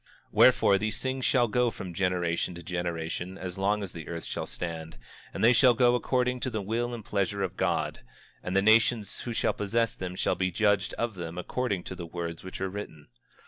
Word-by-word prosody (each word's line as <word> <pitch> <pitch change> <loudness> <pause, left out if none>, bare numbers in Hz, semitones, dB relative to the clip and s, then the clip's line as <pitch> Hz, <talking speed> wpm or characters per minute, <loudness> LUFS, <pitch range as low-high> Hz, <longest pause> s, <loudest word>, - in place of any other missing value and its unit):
25:22 - - -34 0.2
Wherefore, 100 - +6
these 110 +1 -2
things 130 0 -2
shall 125 -4 +4
go 125 +2 +2
from 95 -5 -7
generation 90 -1 0
to 85 - -9
generation 85 +1 -3
as 90 +1 -6
long 100 +2 +1
as 95 - -5
the 80 -2 -8
earth 85 -1 -5
shall - - -4
stand; 80 -5 -6 0.3
and - - -4
they 120 +2 +7
shall 125 0 +6
go 120 +1 +5
according 125 0 +1
to 130 - -2
the 110 -3 -2
will 115 +4 -1
and 110 -4 -9
pleasure 100 0 -1
of 95 -1 -3
God; - - 0 0.4
and 90 - -4
the 95 - +4
nations 110 0 +3
who 120 - -5
shall - - +1
possess 115 +3 0
them 90 -1 -5
shall - - +1
be 95 -1 0
judged 100 -1 +1
of 120 -1 -1
them 85 -2 -6
according 100 +1 -2
to - - -6
the 90 -2 -7
words 85 -1 -5
which 95 - -7
are 95 0 -1
written. 80 -7 -8
95 Hz, 215 wpm, -28 LUFS, 90-115 Hz, 0.4 s, they